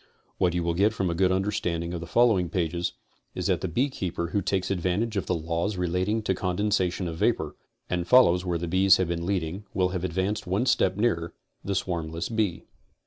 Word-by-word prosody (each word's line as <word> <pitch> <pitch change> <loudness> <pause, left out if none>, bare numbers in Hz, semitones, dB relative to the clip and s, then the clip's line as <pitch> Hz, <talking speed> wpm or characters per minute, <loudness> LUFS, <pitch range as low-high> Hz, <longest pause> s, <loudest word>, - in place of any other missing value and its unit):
What 90 -2 +2
you 90 - 0
will 85 0 0
get 100 +5 +2
from 95 -3 -1
a - - -1
good 90 +2 +2
understanding 90 -3 -1
of 85 - -4
the 85 - -7
following 105 -4 +3
pages 85 -1 -1 0.4
is - - -3
that - - +1
the - - -1
bee 120 - +1
keeper 90 - -4
who 100 - 0
takes 95 0 -1
advantage 95 +5 0
of 100 - -2
the 90 - +1
laws 85 +5 -2
relating 90 +5 0
to 95 - +1
condensation 95 -1 0
of 80 -1 -5
vapor, - - 0 0.3
and 90 -1 -2
follows 90 -9 +6
where 90 -2 -1
the 85 +1 -4
bees 95 +2 +5
have 95 -2 0
been 85 0 -2
leading 95 0 -2
will 95 -1 +2
have 90 -1 -3
advanced 95 +3 -1
one 100 +7 +1
step 95 -7 +2
nearer 95 -7 0 0.3
the 100 - -2
swarmless 85 -3 -2
bee. 110 -6 -1
90 Hz, 205 wpm, -26 LUFS, 85-100 Hz, 0.4 s, follows